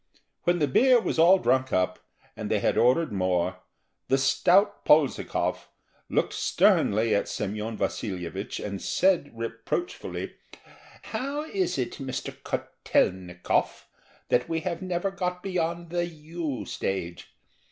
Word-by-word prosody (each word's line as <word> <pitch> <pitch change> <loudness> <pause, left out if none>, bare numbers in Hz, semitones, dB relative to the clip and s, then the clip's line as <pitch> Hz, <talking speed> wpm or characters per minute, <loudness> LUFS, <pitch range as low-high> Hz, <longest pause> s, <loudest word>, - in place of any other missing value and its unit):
When 175 0 +3
the 150 -3 +2
beer 250 - +5
was 220 - -2
all 175 +4 +7
drunk 130 -7 +1
up, 90 0 +1 0.4
and - - -5
they - - +2
had - - +1
ordered 130 +5 +3
more, 90 -2 0 0.5
the 135 - +3
stout 190 +9 +3
Polzikov 150 -2 +2 0.4
looked - - +1
sternly 110 +2 +3
at 100 - +1
Semyon 105 +2 -3
Vasilyevich, 95 -1 -3
and 100 -2 -5
said 185 -6 +2
reproachfully: 115 - -4 0.8
"How 280 +3 -2
is 370 - -1
it, 125 -2 -3
Mr. 130 -2 -4
Kotel'nikov, 90 -1 -1 0.4
that 125 0 +2
we 165 -1 -1
have 170 +1 -3
never 185 +1 -1
got 180 -2 -3
beyond 170 -2 -2
the 175 0 0
"you' 155 - -5
stage? 90 -4 -4
145 Hz, 125 wpm, -27 LUFS, -, 0.8 s, all